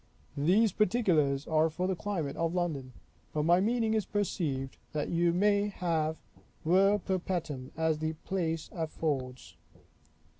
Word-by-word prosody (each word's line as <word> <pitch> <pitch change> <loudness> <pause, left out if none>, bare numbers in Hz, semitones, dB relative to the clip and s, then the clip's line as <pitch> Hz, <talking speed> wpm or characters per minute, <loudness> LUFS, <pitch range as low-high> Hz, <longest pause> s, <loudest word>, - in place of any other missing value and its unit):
These 195 +9 +4
particulars 170 - +2
are 160 0 +3
for 170 +4 -2
the 190 0 0
climate 165 -6 -3
of 165 +1 -1
London; 150 -8 -2 0.4
but 150 - 0
my 170 +3 +5
meaning 225 +2 +1
is 220 -1 +2
perceived, 155 -11 -2 0.2
that 150 -1 -2
you 170 0 +2
may 205 +3 +3
have 165 -5 -1 0.5
ver 195 +5 +5
perpetuum, 175 -9 -3
as 160 -1 +1
the 155 0 -1
place 165 -4 -2
affords. 145 -6 -3
170 Hz, 135 wpm, -30 LUFS, 155-190 Hz, 0.5 s, my